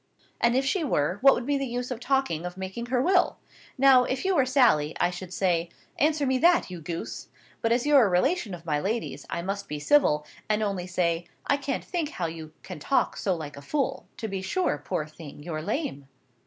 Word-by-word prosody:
"And 235 Hz, +1 st, +3 dB
if 265 Hz, +1 st, +2 dB
she 345 Hz, +5 st, +1 dB
were, 180 Hz, -, 0 dB
what 275 Hz, +1 st, +7 dB
would 240 Hz, -, -4 dB
be 285 Hz, 0 st, +1 dB
the 275 Hz, -, -2 dB
use 245 Hz, +1 st, -4 dB
of 245 Hz, -, -3 dB
talking 265 Hz, -, 0 dB
of 180 Hz, +1 st, -6 dB
making 190 Hz, +5 st, -5 dB
her 250 Hz, 0 st, +1 dB
will? 365 Hz, +7 st, +3 dB, 0.4 s
Now, 265 Hz, -1 st, +7 dB
if 260 Hz, +6 st, -2 dB
you 385 Hz, -, +3 dB
were 270 Hz, -5 st, +3 dB
Sally, 235 Hz, -, +3 dB
I 175 Hz, -, +2 dB
should 180 Hz, 0 st, -8 dB
say, 175 Hz, -2 st, 0 dB, 0.3 s
'Answer 300 Hz, 0 st, +2 dB
me 260 Hz, -1 st, +1 dB
that, 340 Hz, -, +4 dB
you 175 Hz, -2 st, -7 dB
goose!' 155 Hz, -8 st, -5 dB, 0.3 s
But, 230 Hz, -, +1 dB
as 240 Hz, +2 st, +2 dB
you're 290 Hz, -3 st, +6 dB
a 205 Hz, -, +3 dB
relation 195 Hz, -, +1 dB
of 170 Hz, -1 st, -14 dB
my 150 Hz, -3 st, 0 dB
lady's, 220 Hz, +8 st, -3 dB
I 170 Hz, -, -3 dB
must 200 Hz, +2 st, -3 dB
be 150 Hz, -, -3 dB
civil, 150 Hz, -, +3 dB, 0.2 s
and 215 Hz, 0 st, +2 dB
only 195 Hz, -3 st, -2 dB
say, 175 Hz, -1 st, 0 dB, 0.2 s
'I 285 Hz, -, +2 dB
can't 275 Hz, -1 st, -3 dB
think 340 Hz, -5 st, -2 dB
how 180 Hz, -, -3 dB
you 160 Hz, -1 st, -6 dB
can -, -, -8 dB
talk 265 Hz, -, +1 dB
so 190 Hz, -3 st, 0 dB
like 150 Hz, -3 st, -7 dB
a 140 Hz, -, -10 dB
fool!' 275 Hz, -, -2 dB
To 225 Hz, -, -4 dB
be 195 Hz, -2 st, -4 dB
sure, 190 Hz, -, -1 dB
poor 150 Hz, +2 st, -2 dB
thing, 155 Hz, -2 st, -11 dB
you're 155 Hz, -2 st, -4 dB
lame!" 175 Hz, -, -3 dB
205 Hz, 220 wpm, -27 LUFS, 170-270 Hz, 0.4 s, what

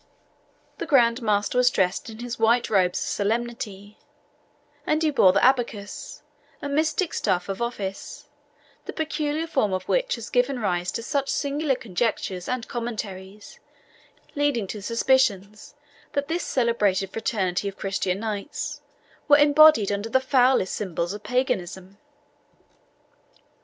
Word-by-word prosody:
The 335 Hz, -, -4 dB
Grand 245 Hz, -5 st, +4 dB
Master 210 Hz, +2 st, +1 dB
was 250 Hz, 0 st, +5 dB
dressed 190 Hz, -1 st, 0 dB
in 220 Hz, -, -9 dB
his 245 Hz, -1 st, -5 dB
white 230 Hz, +1 st, +2 dB
robes 185 Hz, -3 st, +2 dB
of -, -, -3 dB
solemnity, 215 Hz, -2 st, -3 dB, 0.8 s
and 310 Hz, +1 st, 0 dB
he 310 Hz, -, +2 dB
bore 195 Hz, -9 st, +5 dB
the 195 Hz, -, +3 dB
ABACUS, 230 Hz, -6 st, -2 dB, 0.4 s
a -, -, -5 dB
mystic 310 Hz, +4 st, 0 dB
staff 180 Hz, 0 st, 0 dB
of 195 Hz, +2 st, -4 dB
office, 205 Hz, -5 st, -5 dB, 0.6 s
the -, -, -6 dB
peculiar 310 Hz, 0 st, -2 dB
form 265 Hz, -11 st, 0 dB
of 185 Hz, 0 st, -2 dB
which -, -, +1 dB
has 230 Hz, -2 st, -9 dB
given 250 Hz, +1 st, +1 dB
rise 180 Hz, -5 st, -1 dB
to 230 Hz, -, -4 dB
such 275 Hz, +2 st, -1 dB
singular 285 Hz, 0 st, 0 dB
conjectures 190 Hz, -4 st, -3 dB
and 255 Hz, -2 st, -3 dB
commentaries, 210 Hz, -4 st, -6 dB, 0.7 s
leading 285 Hz, -7 st, 0 dB
to 210 Hz, -, -6 dB
suspicions 215 Hz, -3 st, 0 dB, 0.4 s
that 285 Hz, 0 st, -1 dB
this 335 Hz, +3 st, -2 dB
celebrated 210 Hz, -6 st, +1 dB
fraternity 200 Hz, -5 st, -1 dB
of 195 Hz, 0 st, -6 dB
Christian 195 Hz, 0 st, -2 dB
knights 210 Hz, -3 st, -4 dB, 0.5 s
were 290 Hz, -2 st, +7 dB
embodied 290 Hz, -7 st, +6 dB
under 205 Hz, +2 st, -3 dB
the 260 Hz, -, +3 dB
foulest 260 Hz, -5 st, +2 dB
symbols 175 Hz, -3 st, -3 dB
of 205 Hz, -, -7 dB
paganism. 200 Hz, -5 st, -2 dB
230 Hz, 135 wpm, -24 LUFS, 200-265 Hz, 0.8 s, were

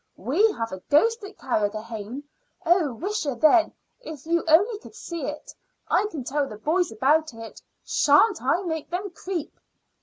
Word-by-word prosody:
We 325 Hz, -, +2 dB
have 230 Hz, 0 st, -4 dB
a 190 Hz, 0 st, -7 dB
ghost 455 Hz, +10 st, +3 dB
at 400 Hz, 0 st, -10 dB
Carrigrohane. 220 Hz, +2 st, -3 dB, 0.4 s
Oh, 340 Hz, -4 st, +3 dB
wisha, 360 Hz, -7 st, -2 dB
then, 320 Hz, +2 st, +5 dB, 0.3 s
if 315 Hz, -, -9 dB
you 335 Hz, +1 st, +1 dB
only 400 Hz, +8 st, +4 dB
could 425 Hz, -, -14 dB
see 335 Hz, -, -5 dB
it! 300 Hz, 0 st, -7 dB, 0.4 s
I 420 Hz, -, +3 dB
can 300 Hz, -10 st, -6 dB
tell 280 Hz, +2 st, -1 dB
the 215 Hz, -, -8 dB
boys 330 Hz, -, 0 dB
about 285 Hz, +5 st, +1 dB
it. 225 Hz, 0 st, -10 dB, 0.2 s
Sha'n't 325 Hz, +7 st, +4 dB
I 305 Hz, +9 st, +1 dB
make 320 Hz, -4 st, -4 dB
them 370 Hz, +3 st, -3 dB
creep?" 350 Hz, -2 st, -5 dB
315 Hz, 160 wpm, -25 LUFS, 260-370 Hz, 0.4 s, then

